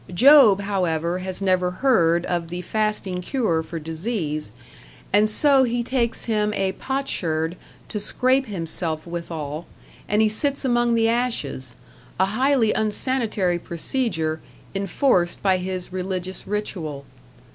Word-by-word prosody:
Job, 245 -4 +7
however, 180 -3 -1
has 185 +1 -5
never 185 -1 +2
heard 175 -6 +2
of 175 -2 -2
the 175 +2 -5
fasting 210 -4 -1
cure 180 -7 0
for 165 +1 -7
disease, 160 - -2 0.6
and 210 +2 +5
so 275 +4 +4
he 240 -1 0
takes 235 -2 -1
him 210 -2 +1
a 195 -1 0
potsherd 175 - -2 0.3
to 210 - -4
scrape 260 +5 +1
himself 165 -4 -1
withal, 165 -2 -5 0.4
and 210 +2 +3
he - - +4
sits 280 +6 0
among 240 -2 +2
the 225 0 +3
ashes 225 - -1 0.4
a 190 - +5
highly 240 +2 +2
unsanitary 215 -5 0
procedure 165 -3 -2 0.3
enforced 195 -1 +1
by 190 -2 +3
his 185 -1 -5
religious 185 0 -4
ritual. 170 -9 -4
190 Hz, 125 wpm, -23 LUFS, 170-230 Hz, 0.6 s, Job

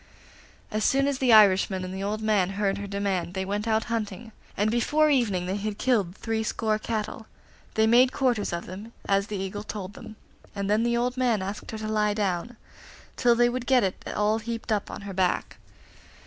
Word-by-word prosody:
As 215 0 -1
soon 275 +1 +3
as 280 -2 -1
the 255 -2 +3
Irishman 195 -3 +5
and 185 - -6
the 190 - -5
old 210 +2 -2
man 205 -4 +2
heard 200 -1 0
her 200 - -5
demand 195 -3 -2
they 190 0 -2
went 205 +3 -2
out 220 0 +2
hunting, 225 -1 -4 0.3
and 210 +2 +2
before 300 +6 +3
evening 210 -10 +1
they 190 +2 -2
had 205 0 -4
killed 205 -9 +1
three 225 0 -2
score 220 0 -1
cattle. 220 0 -4 0.5
They 220 - +4
made 245 +3 +5
quarters 250 -6 0
of 170 0 -4
them, 205 +6 -9
as 195 0 +2
the 210 - -4
Eagle 195 +2 -4
told 205 -2 -6
them, 215 - -11 0.4
and 200 -1 -2
then 210 +2 +2
the 235 0 +1
old 250 +1 -1
man 235 -6 +1
asked 200 +2 -6
her 220 - -5
to 215 0 -5
lie 210 -1 +1
down, 205 +3 -2 0.6
till 240 -1 +4
they 240 +1 +4
would 245 0 -3
get 260 -4 +4
it 190 -1 -2
all 210 +1 +2
heaped 230 0 -5
up 210 -2 0
on - - -7
her 200 -1 -7
back. 185 -1 0
215 Hz, 205 wpm, -26 LUFS, 195-235 Hz, 0.6 s, Irishman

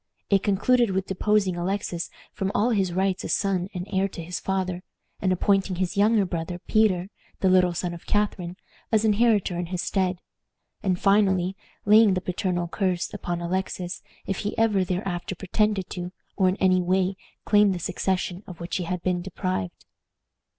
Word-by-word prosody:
It 195 -1 +5
concluded 230 +4 +3
with 190 0 -1
deposing 195 -1 +1
Alexis 175 -1 -2 0.2
from 195 -1 -2
all 235 +4 +3
his 195 -5 +1
rights 190 +1 0
as - - -1
son 190 -2 0
and 180 -1 -5
heir 190 +1 +2
to 170 -3 -8
his 175 +2 -4
father, 185 -2 -2 0.4
and 185 - +2
appointing 195 +1 +2
his 185 0 -2
younger 210 0 +4
brother 175 0 -4
Peter, 190 -1 +1 0.3
the 190 - +4
little 180 -1 +4
son 175 +1 -2
of 170 - -11
Catharine, 190 -4 -1 0.3
as 220 -1 +3
inheritor 210 -4 +3
in 175 - -3
his 180 0 -3
stead; 185 -2 0 0.6
and 185 -2 0
finally 195 -2 +3 0.3
laying 210 -1 +6
the - - +1
paternal 180 -1 -2
curse 185 -1 -1
upon 175 0 -3
Alexis 180 0 -3 0.2
if 195 - -2
he 205 - -3
ever 215 -4 +3
thereafter 180 0 -3
pretended 195 +1 0
to, 180 0 -5 0.2
or 190 -2 +3
in 185 - 0
any 185 -2 +3
way 185 +1 +1 0.3
claimed 205 -2 +4
the - - -4
succession 185 +1 -2
of 175 -3 -9
which 170 +1 -3
he 180 - -3
had 180 0 -3
been 180 -1 0
deprived. 185 - -4
185 Hz, 170 wpm, -25 LUFS, 180-200 Hz, 0.6 s, laying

